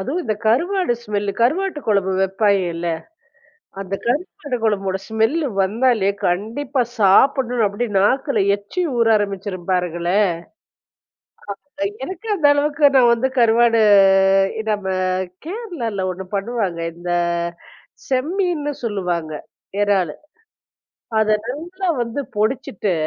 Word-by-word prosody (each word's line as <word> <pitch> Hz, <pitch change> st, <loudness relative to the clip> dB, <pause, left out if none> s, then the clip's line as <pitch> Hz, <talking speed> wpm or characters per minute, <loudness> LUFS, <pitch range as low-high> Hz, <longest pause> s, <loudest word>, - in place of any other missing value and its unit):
அதுவும் 285 Hz, -, -2 dB
இந்த 215 Hz, -3 st, -1 dB
கருவாடு 345 Hz, -, +2 dB
ஸ்மெல்லு. 205 Hz, -1 st, -2 dB
கருவாட்டு 340 Hz, +6 st, +1 dB
கொழம்பு 200 Hz, -3 st, +1 dB
வைப்பாய்ங்கல்ல, 190 Hz, -3 st, +1 dB, 0.9 s
அந்த 195 Hz, 0 st, -4 dB
கருவாடு 290 Hz, 0 st, -2 dB
கொழம்போட 195 Hz, -3 st, 0 dB
ஸ்மெல்லு 225 Hz, +9 st, +1 dB, 0.2 s
வந்தாலே 220 Hz, 0 st, +2 dB, 0.2 s
கண்டிப்பா 225 Hz, +10 st, -1 dB, 0.2 s
சாப்பிடணுன்னு 240 Hz, +3 st, +4 dB
அப்படி 205 Hz, +5 st, -3 dB
நாக்குல 265 Hz, +8 st, +2 dB, 0.2 s
எச்சி 205 Hz, -, -4 dB
ஊற 230 Hz, -1 st, +3 dB
ஆரம்பிச்சுரும் 195 Hz, -3 st, -4 dB
பாருங்களேன். 180 Hz, +2 st, +1 dB, 1.6 s
அ -, -, +3 dB, 0.2 s
எனக்கு 375 Hz, +7 st, -8 dB
அந்த 315 Hz, -6 st, +3 dB
அளவுக்கு 290 Hz, 0 st, +3 dB
நான் 245 Hz, -2 st, +6 dB
வந்து 245 Hz, +3 st, 0 dB
கருவாடு 230 Hz, 0 st, +4 dB, 0.9 s
நம்ப 205 Hz, -2 st, -2 dB, 0.6 s
கேரளால 330 Hz, -, -4 dB
ஒண்ணு 185 Hz, +1 st, -7 dB
பண்ணுவாங்க. 200 Hz, -4 st, -2 dB, 0.2 s
இந்த 175 Hz, +1 st, -7 dB, 1.0 s
செம்மீன்னு 300 Hz, +2 st, -1 dB
சொல்லுவாங்க, 180 Hz, -7 st, -2 dB, 0.5 s
எறாலு. 190 Hz, -6 st, +1 dB, 1.1 s
அத 215 Hz, 0 st, +2 dB
நல்லா 350 Hz, +9 st, -4 dB
வந்து 235 Hz, +4 st, -3 dB, 0.2 s
பொடிச்சுட்டு 215 Hz, -3 st, -1 dB
225 Hz, 100 wpm, -20 LUFS, 195-280 Hz, 1.6 s, நான்